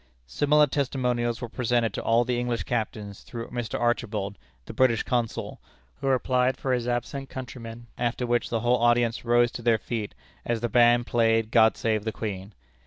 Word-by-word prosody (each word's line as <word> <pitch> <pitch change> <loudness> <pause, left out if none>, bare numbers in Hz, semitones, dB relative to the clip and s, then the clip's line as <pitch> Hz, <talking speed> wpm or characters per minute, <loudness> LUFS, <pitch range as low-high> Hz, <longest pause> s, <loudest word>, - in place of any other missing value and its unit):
Similar 145 - +3
testimonials 125 -4 -1
were 120 - -3
presented 120 -2 0
to - - -3
all 115 +1 +2
the 125 -1 -1
English 120 -1 -2
captains 105 -4 -4
through 115 -1 -7
Mr. 120 -2 -3
Archibald, 110 -4 -1 0.3
the - - -8
British 125 -3 +3
Consul, 120 -3 -2 0.4
who - - -4
replied 130 0 +2
for 130 - -1
his 120 -1 -1
absent 125 +3 -3
countrymen, 120 -2 -8
after 120 +1 -1
which 120 0 0
the 115 -2 -1
whole 120 +1 +3
audience 120 -1 +2
rose 120 0 +3
to - - -7
their 115 -1 +3
feet, 110 -1 -5 0.3
as 120 -2 -2
the 120 - -1
band 120 +1 +4
played 115 -2 +2
"God 110 -2 +5
save 110 -2 0
the 110 - -2
Queen." 100 -2 -6
120 Hz, 175 wpm, -26 LUFS, 115-125 Hz, 0.4 s, God